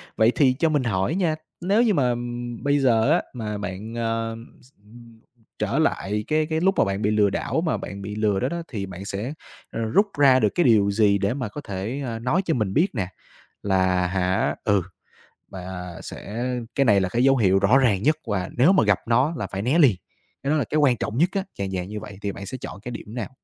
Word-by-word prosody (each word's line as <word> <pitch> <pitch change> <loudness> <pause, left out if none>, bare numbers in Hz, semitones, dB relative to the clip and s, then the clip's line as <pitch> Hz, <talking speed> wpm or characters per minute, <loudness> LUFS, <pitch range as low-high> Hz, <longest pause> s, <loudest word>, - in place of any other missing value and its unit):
Vậy 110 +1 +4
thì 135 -4 +4
cho 160 +5 +1
mình 145 -4 +1
hỏi 100 - 0
nha, 175 -5 +1 0.3
nếu 200 +6 +3
như 220 - +3
mà, 135 -7 +2
ừm, 120 0 -4
bây 145 0 +2
giờ 120 -1 +3
á, 170 - +4
mà 105 -3 -4
bạn, 105 +2 -6
ờ, 115 -1 -2 0.3
x 130 - -22
ừm, 115 +1 -16 0.4
trở - - 0
lại 105 +2 0
cái 155 0 +2
cái 160 0 -1
lúc 190 +1 +3
mà - - +4
bạn 100 +1 -2
bị 105 - +1
lừa 105 -1 +3
đảo 160 +10 -1
mà 165 - 0
bạn 100 0 -7
bị 100 +1 -6
lừa 105 -2 +1
đó 130 - 0
đó 170 0 -3
thì 100 -7 -4
bạn 95 +1 -8
sẽ, 105 +8 -4 0.4
ờ, - - -5
rút 155 - +2
ra 135 -2 +6
được 105 -4 +3
cái 175 - +3
điều 105 -7 +4
gì 100 -1 +3
để 100 +3 0
mà 130 -4 -3
có 145 - -7
thể, 110 +5 -4
ơ, 115 -2 -4
nói 130 +11 +1
cho 165 - +1
mình 105 -7 -1
biết 165 +7 +3
nè, 95 -5 -1 0.6
là 95 -2 +2
hả, 95 +2 0
ừ 100 -3 +2 0.7
mà 90 -1 -7
sẽ 115 +5 -6 0.3
cái 140 - +3
này 100 -4 +5
là 95 - -1
cái 120 +5 +1
dấu 135 0 +5
hiệu 95 -3 +3
rõ 100 +7 +4
ràng 110 -7 +2
nhất 155 +2 +3
và 95 -4 -2
nếu 145 +10 +6
mà 185 - +4
gặp 100 -3 +3
nó 130 +7 +2
là 100 - -3
phải 95 0 -4
né 130 +9 +2
liền, 130 - +6 0.5
cái 140 - -2
đó - - +3
là - - +1
cái 155 - -2
quan 135 -6 +3
trọng 110 - -3
nhất 170 +6 +3
á, 195 -1 -1 0.2
dạng 95 -1 -2
dạng 90 -1 -3
như 105 +1 -5
vậy 105 -2 -10
thì 100 - -2
bạn 100 0 -8
sẽ 130 - -6
chọn - - -7
cái 120 - -6
điểm 110 -1 -8
nào? 120 -2 -4
115 Hz, 245 wpm, -24 LUFS, 100-135 Hz, 0.7 s, ra